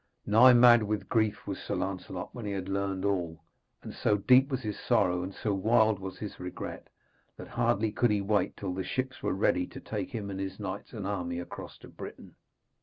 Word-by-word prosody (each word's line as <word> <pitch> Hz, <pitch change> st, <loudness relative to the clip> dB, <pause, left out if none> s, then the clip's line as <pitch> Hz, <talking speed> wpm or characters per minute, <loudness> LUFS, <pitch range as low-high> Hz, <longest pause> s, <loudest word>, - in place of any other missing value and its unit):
Nigh 125 Hz, +5 st, +7 dB
mad 120 Hz, -1 st, +8 dB
with 105 Hz, -2 st, -2 dB
grief 110 Hz, -2 st, 0 dB
was -, -, -4 dB
Sir -, -, -3 dB
Lancelot 95 Hz, -1 st, -4 dB
when 120 Hz, -, -7 dB
he 100 Hz, -, -2 dB
had 95 Hz, -1 st, -4 dB
learned 100 Hz, -1 st, -2 dB
all, 85 Hz, -5 st, -1 dB, 0.4 s
and -, -, -7 dB
so 105 Hz, -, +1 dB
deep 130 Hz, +7 st, +5 dB
was 130 Hz, -2 st, -2 dB
his 105 Hz, -1 st, -4 dB
sorrow 90 Hz, -7 st, +2 dB
and 95 Hz, +2 st, -4 dB
so 105 Hz, +1 st, -2 dB
wild 110 Hz, +1 st, +3 dB
was 95 Hz, 0 st, -7 dB
his 105 Hz, -, -7 dB
regret, 90 Hz, 0 st, -6 dB, 0.5 s
that -, -, -9 dB
hardly 110 Hz, +2 st, +1 dB
could 120 Hz, +3 st, +2 dB
he 105 Hz, -1 st, +2 dB
wait 100 Hz, +1 st, 0 dB
till 95 Hz, -3 st, -3 dB
the 95 Hz, +1 st, -3 dB
ships 130 Hz, +4 st, -3 dB
were -, -, 0 dB
ready 90 Hz, -2 st, +1 dB
to -, -, -10 dB
take -, -, -4 dB
him 100 Hz, -3 st, -5 dB
and 95 Hz, -, -5 dB
his 95 Hz, +1 st, -5 dB
knights 100 Hz, 0 st, -5 dB
and 105 Hz, -4 st, -5 dB
army 90 Hz, -4 st, -2 dB
across 90 Hz, -, -8 dB
to -, -, -14 dB
Britain. -, -, -10 dB
100 Hz, 210 wpm, -29 LUFS, 95-110 Hz, 0.5 s, mad